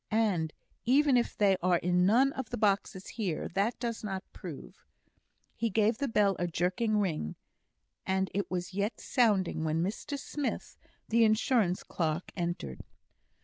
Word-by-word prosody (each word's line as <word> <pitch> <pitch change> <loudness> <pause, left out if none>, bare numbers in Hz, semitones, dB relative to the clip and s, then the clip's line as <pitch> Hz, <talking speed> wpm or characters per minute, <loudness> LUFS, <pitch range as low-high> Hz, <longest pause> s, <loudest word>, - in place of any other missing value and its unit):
And 200 -8 +1 0.3
even 275 +2 +4
if 240 -1 +1
they 195 -2 +4
are 180 0 +3
in 180 +1 +2
none 260 +6 +4
of 260 -4 -5
the - - -3
boxes 195 -2 0
here, 190 -9 -3
that 200 +6 0
does 235 -2 -3
not 190 -2 -3
prove - - -9 0.4
" - - -49 0.3
He 230 - 0
gave 220 +2 +2
the 280 - 0
bell 205 -4 +3
a 175 - 0
jerking 185 +6 0
ring, 165 - -1 0.7
and 190 0 0
it 200 +1 -1
was 180 0 -3
yet 200 +3 -1
sounding 200 -9 +2
when 160 +1 +1
Mr 215 +9 -3
Smith, 285 0 -4 0.3
the 230 +1 +4
insurance 215 -3 +2
clerk, 160 0 -2
entered. 170 - -3
200 Hz, 155 wpm, -30 LUFS, 180-230 Hz, 0.7 s, even